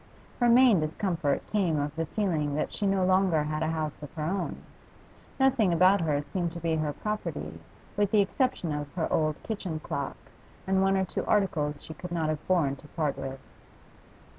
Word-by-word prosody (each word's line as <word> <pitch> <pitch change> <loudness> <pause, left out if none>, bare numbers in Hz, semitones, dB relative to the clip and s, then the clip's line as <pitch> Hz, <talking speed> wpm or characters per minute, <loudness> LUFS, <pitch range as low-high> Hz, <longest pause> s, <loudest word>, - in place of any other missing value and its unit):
Her 240 -1 +4
main 240 -5 +6
discomfort 160 -1 -1
came 185 -7 +2
of 145 0 -2
the 165 0 -2
feeling 155 -8 -1
that 155 - -2
she 205 - -1
no 195 -1 +2
longer 185 -4 +3
had 155 +1 -2
a 160 - +1
house 155 -2 -3
of 150 - -8
her 155 - -3
own; 185 +4 -1 0.8
nothing 250 -8 +4
about 185 +3 +5
her 150 -3 0
seemed 175 +1 -3
to 170 - -6
be 165 -1 0
her 155 -1 0
property 170 - -4 0.4
with 205 -1 +2
the 215 - +4
exception 200 - 0
of 145 -1 -4
her 165 -3 -1
old 155 -1 +2
kitchen 190 -7 -4
clock, 140 -2 -4 0.5
and 190 0 +2
one 195 0 +3
or 190 - +1
two - - -3
articles 150 -8 +1
she 160 - -8
could 180 +2 -8
not 165 -2 0
have 155 -1 -3
borne 155 -7 +2
to 150 - -15
part 150 -2 -1
with. 135 0 -6
165 Hz, 190 wpm, -28 LUFS, 150-195 Hz, 0.8 s, main